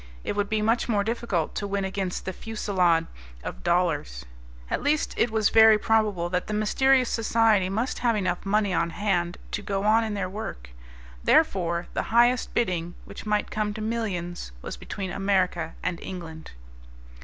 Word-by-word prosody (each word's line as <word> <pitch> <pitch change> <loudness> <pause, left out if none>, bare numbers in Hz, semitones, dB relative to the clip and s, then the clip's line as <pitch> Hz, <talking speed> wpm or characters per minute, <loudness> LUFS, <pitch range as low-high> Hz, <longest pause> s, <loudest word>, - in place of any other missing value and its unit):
It - - -3
would 205 -1 -1
be 215 -1 0
much 230 +3 +1
more 205 -3 +2
difficult 220 -7 -1
to 205 - -3
win 200 -1 -1
against 190 -1 -3
the 190 - -3
fusillade 185 -7 +1 0.4
of - - -6
dollars. 165 - 0 0.4
At - - -2
least 295 +1 +1
it 235 - +2
was 220 -2 +2
very 220 -1 +7
probable 210 -5 +1
that 180 0 -1
the 210 - -2
mysterious 255 +4 +3
society 220 -4 +2
must 225 +6 -2
have 235 -2 +2
enough 185 -4 -1
money 205 -1 +1
on 170 0 +1
hand 175 -2 -1
to 210 - -2
go 200 -1 -2
on 220 +2 +4
in 215 -2 -3
their 195 -2 -2
work. 60 - -7 0.5
Therefore, 170 -2 +2
the - - 0
highest 240 +2 +3
bidding, 175 -6 -1
which - - -9
might 210 0 0
come 210 -1 -2
to 215 - -5
millions, 195 - -3
was - - -5
between 190 -2 -6
America 185 -4 0
and 175 -2 -2
England. 165 - -8
200 Hz, 170 wpm, -26 LUFS, 175-220 Hz, 0.5 s, very